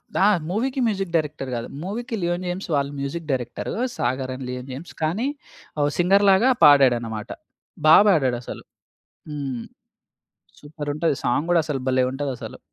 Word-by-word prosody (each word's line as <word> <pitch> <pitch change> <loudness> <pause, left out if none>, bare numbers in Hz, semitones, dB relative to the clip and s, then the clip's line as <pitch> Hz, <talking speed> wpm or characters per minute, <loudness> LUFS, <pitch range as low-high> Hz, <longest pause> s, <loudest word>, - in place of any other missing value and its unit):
The - - 0 0.3
మూవీ‌కి 260 +7 -1
music 195 -5 -2
director 150 -4 -1
గాదు. 115 - -4 0.2
మూవీ‌కి 230 +5 -4
'లియోనిమ్స్' 175 +1 -2
వాళ్ళు 140 0 0
మ్యూజిక్ 155 +4 -4
డైరెక్టరు. 125 -2 -3 0.2
'సాగర్' 130 +2 -2
అండ్ 130 0 -7
'లియోనిమ్స్'. 130 +5 -7
కానీ 190 +12 0 0.5
ఓ - - +3
సింగర్ 195 +3 +4
లాగా 230 +8 +4 0.2
పాడాడన్నమాట. 120 -6 +4 0.6
బా 155 - +9
పాడాడు 135 -10 +2
అసలు. - - -8 0.7
హ్మ్. 135 -5 -4 1.0
సూపరంటది. 150 0 -2
సాంగ్ 140 +6 +1
కూడా 170 - +5
అసలు 145 -4 -2
భలే 130 0 +3
ఉంటది 140 0 -3
అసలు. - - -8
150 Hz, 135 wpm, -23 LUFS, 130-180 Hz, 1.0 s, బా